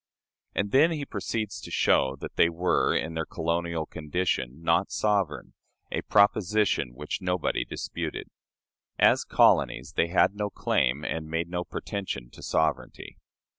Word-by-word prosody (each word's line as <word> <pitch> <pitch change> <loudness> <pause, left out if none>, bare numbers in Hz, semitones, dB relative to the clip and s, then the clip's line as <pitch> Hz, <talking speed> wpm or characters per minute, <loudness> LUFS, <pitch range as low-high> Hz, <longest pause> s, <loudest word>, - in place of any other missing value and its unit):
And 100 - -1
then 145 +5 +5
he 150 -4 -3
proceeds 110 -6 -4
to - - -9
show 65 0 +2
that - - -7
they 85 - +5
were, 85 +2 +1
in 80 - -1
their 80 0 -2
colonial 85 -1 -2
condition, 75 -4 -2
not 85 +3 +2
sovereign 100 -7 -1 0.4
a - - -1
proposition 100 - +2
which 75 +8 -5
nobody 90 -2 0
disputed. - - -5 0.7
As - - +4
colonies, - - +3
they 85 - +2
had 90 +2 +3
no 105 0 -2
claim, 70 -6 0
and 80 -1 -3
made 80 +1 -2
no 90 0 -2
pretension, 90 -9 -5
to - - -14
sovereignty. 80 -3 -2
85 Hz, 140 wpm, -27 LUFS, 80-100 Hz, 0.7 s, then